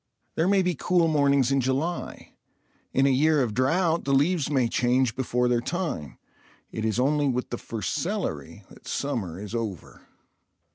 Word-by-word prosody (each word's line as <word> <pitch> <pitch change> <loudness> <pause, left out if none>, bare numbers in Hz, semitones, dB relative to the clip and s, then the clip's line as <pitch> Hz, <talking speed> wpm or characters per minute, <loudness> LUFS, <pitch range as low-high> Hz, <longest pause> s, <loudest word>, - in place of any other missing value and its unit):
There 165 - +1
may 195 -1 +3
be 180 0 +1
cool 170 +2 +2
mornings 140 -4 +3
in 135 0 +2
July; 135 +7 -3 0.6
in 135 - +2
a 140 - +4
year 150 +2 +3
of 115 -4 -2
drought 165 - +1
the 140 0 +1
leaves 150 +2 +2
may 130 -5 +2
change 125 +1 +1
before 125 -1 0
their 120 -1 +1
time; 160 - -4 0.5
it 110 - -4
is 110 +1 0
only 145 +2 +2
with 125 -1 -2
the 120 - -3
first 110 -5 -4
celery - - -3
that - - -16
summer 105 - -3
is 105 +1 -8
over. 110 -7 -6
135 Hz, 165 wpm, -26 LUFS, 120-155 Hz, 0.6 s, a